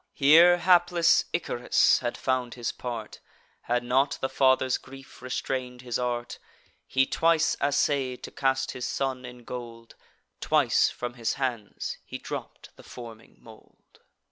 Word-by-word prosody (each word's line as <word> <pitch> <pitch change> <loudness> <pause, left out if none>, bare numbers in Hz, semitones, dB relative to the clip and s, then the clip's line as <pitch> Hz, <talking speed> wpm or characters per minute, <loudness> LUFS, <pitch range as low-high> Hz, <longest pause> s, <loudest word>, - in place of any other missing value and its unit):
Here 165 +5 +7
hapless 175 -1 +4
Icarus 125 -7 +2
had 120 -1 -3
found 130 -2 -1
his 120 -2 -3
part, 115 -3 -7 0.5
Had 120 0 0
not 135 +3 +1
the 135 - -2
father's 130 -1 +2
grief 135 -1 -14
restrain'd 125 0 -4
his 120 -1 -3
art. 120 -1 -3 0.5
He 130 0 +2
twice 165 +1 +2
assay'd 140 -2 0
to - - -7
cast 135 -1 0
his 125 - -5
son 130 -2 -2
in 125 -1 -11
gold; 115 -1 -9 0.5
Twice - - +3
from 120 0 -6
his 120 -2 -2
hands 120 -6 -4
he - - -7
dropp'd - - -8
the - - -13
forming 115 -2 -12
mould. 110 -1 -19
125 Hz, 140 wpm, -27 LUFS, 120-135 Hz, 0.5 s, Here